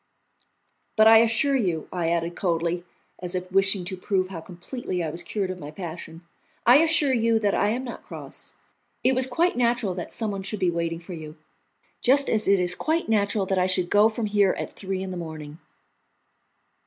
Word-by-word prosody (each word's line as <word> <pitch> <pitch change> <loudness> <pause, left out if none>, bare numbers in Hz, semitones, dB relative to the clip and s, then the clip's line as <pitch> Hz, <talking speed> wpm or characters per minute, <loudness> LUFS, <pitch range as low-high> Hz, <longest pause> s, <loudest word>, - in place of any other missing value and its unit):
"But 215 - +5
I 225 0 +9
assure 230 +5 +2
you," 180 - -1
I 170 -2 -1
added 170 0 -1
coldly, 170 -1 -1 0.4
as 180 0 -3
if 185 0 -4
wishing 195 -1 +2
to 190 +1 -5
prove 185 0 -1
how 175 -4 -7
completely 180 +2 -5
I 160 - -3
was 170 - -4
cured 190 0 -3
of 185 - -7
my 145 - -8
passion, 170 0 -8 0.4
"I 245 +3 +8
assure 315 -3 +3
you 230 -1 +2
that 205 -2 +1
I 205 - +2
am 245 +4 -2
not 240 -3 -7
cross. - - -9 0.5
It 260 - +4
was 255 0 +3
quite 335 +8 +1
natural 240 -4 +1
that 180 -1 -6
someone 205 -4 -3
should 195 +2 -4
be 180 -3 +2
waiting 165 0 -2
for 175 +2 -9
you, 155 -1 -9 0.6
just 275 +3 +3
as 220 -1 +1
it 200 0 +4
is 180 0 +4
quite 315 - -1
natural 205 -2 +1
that 190 0 0
I 180 - +2
should 185 -1 0
go 210 +2 +5
from 225 0 -3
here 205 -2 +2
at - - -5
three 190 -1 -4
in 190 - -5
the 180 - -5
morning." 155 -2 -8
190 Hz, 200 wpm, -25 LUFS, 175-225 Hz, 0.6 s, I